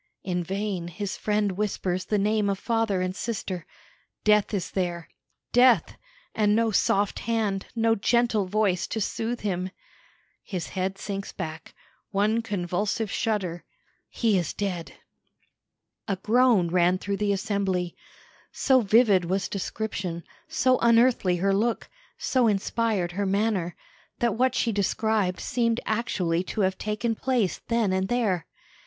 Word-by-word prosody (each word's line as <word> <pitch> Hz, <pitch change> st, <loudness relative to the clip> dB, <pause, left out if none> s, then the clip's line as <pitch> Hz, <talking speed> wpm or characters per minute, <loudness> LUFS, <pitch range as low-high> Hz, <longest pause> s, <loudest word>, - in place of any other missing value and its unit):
In 180 Hz, -2 st, -1 dB
vain 195 Hz, -1 st, -3 dB
his 200 Hz, +2 st, -4 dB
friend 210 Hz, -1 st, 0 dB
whispers 185 Hz, -2 st, -2 dB
the 210 Hz, -, 0 dB
name 210 Hz, 0 st, +1 dB
of 195 Hz, -, 0 dB
father 225 Hz, -4 st, 0 dB
and 185 Hz, 0 st, -2 dB
sister 195 Hz, -7 st, -4 dB, 0.6 s
death 210 Hz, -1 st, +4 dB
is 195 Hz, -5 st, -2 dB
there. 175 Hz, -3 st, -2 dB, 0.4 s
Death 245 Hz, -7 st, +4 dB, 0.4 s
and 210 Hz, -1 st, +3 dB
no 225 Hz, 0 st, +2 dB
soft 200 Hz, 0 st, +1 dB
hand, 215 Hz, -4 st, -1 dB
no 225 Hz, 0 st, +3 dB
gentle 225 Hz, -2 st, +2 dB
voice 200 Hz, -3 st, +1 dB
to 220 Hz, -, -3 dB
soothe 225 Hz, +3 st, -2 dB
him. 185 Hz, -2 st, -2 dB, 0.7 s
His 180 Hz, -5 st, -5 dB
head 190 Hz, +1 st, -2 dB
sinks 200 Hz, 0 st, -5 dB
back; 160 Hz, -3 st, -7 dB, 0.3 s
one 215 Hz, +3 st, +1 dB
convulsive 205 Hz, +1 st, -2 dB
shudder 190 Hz, -7 st, -1 dB, 0.5 s
he 220 Hz, -5 st, +2 dB
is 170 Hz, -, -3 dB
dead!" 185 Hz, -5 st, -3 dB, 1.1 s
A 195 Hz, -, 0 dB
groan 220 Hz, -2 st, +3 dB
ran 180 Hz, +1 st, +3 dB
through 200 Hz, +1 st, -3 dB
the 205 Hz, 0 st, +1 dB
assembly. 190 Hz, -3 st, -1 dB, 0.6 s
So 265 Hz, -1 st, +3 dB
vivid 205 Hz, -4 st, +4 dB
was 190 Hz, +3 st, -1 dB
description, 190 Hz, -4 st, -4 dB, 0.2 s
so 260 Hz, -6 st, +2 dB
unearthly 235 Hz, -5 st, +4 dB
her 195 Hz, +3 st, +1 dB
look, 225 Hz, +4 st, 0 dB, 0.3 s
so 255 Hz, -3 st, +2 dB
inspired 205 Hz, -2 st, 0 dB
her 200 Hz, +2 st, -2 dB
manner, 195 Hz, -3 st, 0 dB, 0.4 s
that 235 Hz, -3 st, +1 dB
what 255 Hz, +3 st, +1 dB
she 230 Hz, -, +1 dB
described 205 Hz, -1 st, 0 dB
seemed 230 Hz, -1 st, 0 dB
actually 185 Hz, -7 st, 0 dB
to 210 Hz, -, -2 dB
have 190 Hz, -1 st, 0 dB
taken 215 Hz, +2 st, -1 dB
place 240 Hz, -4 st, 0 dB
then 230 Hz, -5 st, +1 dB
and 190 Hz, 0 st, 0 dB
there. 205 Hz, -8 st, 0 dB
200 Hz, 135 wpm, -26 LUFS, 185-225 Hz, 1.1 s, death